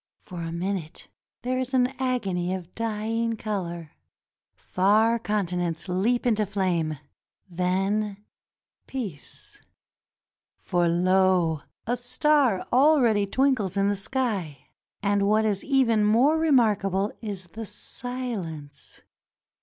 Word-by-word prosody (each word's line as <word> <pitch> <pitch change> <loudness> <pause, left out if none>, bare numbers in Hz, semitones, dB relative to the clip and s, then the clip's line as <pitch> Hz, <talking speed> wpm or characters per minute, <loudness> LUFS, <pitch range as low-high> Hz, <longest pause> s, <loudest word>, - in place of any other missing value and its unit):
For 180 -3 -9
a 165 0 -4
minute 175 -1 -4 0.3
there 255 +1 -1
is 260 +1 -2
an 250 -1 +4
agony 195 -9 -1
of 180 -2 -9
dying 225 +1 -2
color 175 -7 -4 0.4
— - - -69
far 215 +5 +2
continents 180 -5 -2
leap 210 +8 0
into 215 -3 +2
flame; 175 -6 -1 0.5
then, 195 +3 -1 0.7
peace; 210 - -7 1.0
for 175 -1 0
lo! 180 -2 +2 0.2
a 240 - 0
star 250 -2 +2
already 250 -7 +4
twinkles 225 -6 +1
in 200 0 +3
the 205 - +1
sky. 195 - -3 0.3
And 200 -1 +2
what 215 +1 +3
is 205 -3 0
even 250 -6 +3
more 240 +9 +4
remarkable 215 - +2
is 200 -4 -5
the 225 -1 -6
silence. 210 - -5
205 Hz, 110 wpm, -26 LUFS, 180-235 Hz, 1.0 s, an